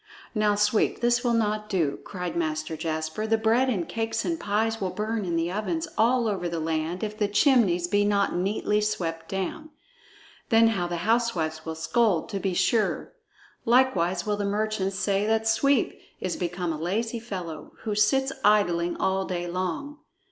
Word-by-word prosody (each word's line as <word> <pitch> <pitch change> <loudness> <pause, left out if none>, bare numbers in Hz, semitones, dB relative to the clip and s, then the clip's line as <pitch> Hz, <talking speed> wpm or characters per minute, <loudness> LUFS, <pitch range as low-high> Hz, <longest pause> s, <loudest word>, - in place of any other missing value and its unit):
"Now, 210 -2 +2
Sweep, 210 +1 +2
this 240 +1 +2
will 240 -2 +2
not 210 -1 0
do!" 165 -8 0
cried 180 -3 -5
Master 155 -1 -2
Jasper. 160 +5 -3
"The 225 0 +3
bread 230 +4 +2
and 185 -9 -1
cakes 225 0 -2
and 330 -1 -1
pies 220 +2 0
will 190 - 0
burn 210 +2 -2
in 170 -2 -1
the 165 +1 0
ovens 320 - -2
all 235 +1 +3
over 190 -4 -1
the 170 -1 -3
land, 160 +3 -2
if 210 0 -3
the 210 -1 0
chimneys 205 - +3
be 205 +3 +2
not 200 -1 +2
neatly 210 +3 0
swept 165 -6 -2
down. 310 - -4 0.8
Then 225 0 +6
how 185 -6 -1
the 175 0 -3
housewives 180 -9 0
will 160 - -3
scold, 180 +2 +1
to 200 -3 -3
be 190 -2 -1
sure! 220 +4 +1 0.5
Likewise 190 -8 +2
will 210 -1 0
the 205 - -2
merchants 200 -1 -1
say 200 +1 +1
that 220 0 +1
Sweep 275 +3 +2 0.2
is 185 -2 -2
become 175 -1 -2
a 155 - -6
lazy 225 +7 -1
fellow, 180 -9 -7
who 215 - -2
sits 265 +6 +2
idling 175 -5 +3
all 190 0 0
day 175 -2 -3
long." 185 - -3
205 Hz, 175 wpm, -26 LUFS, 175-225 Hz, 0.8 s, Then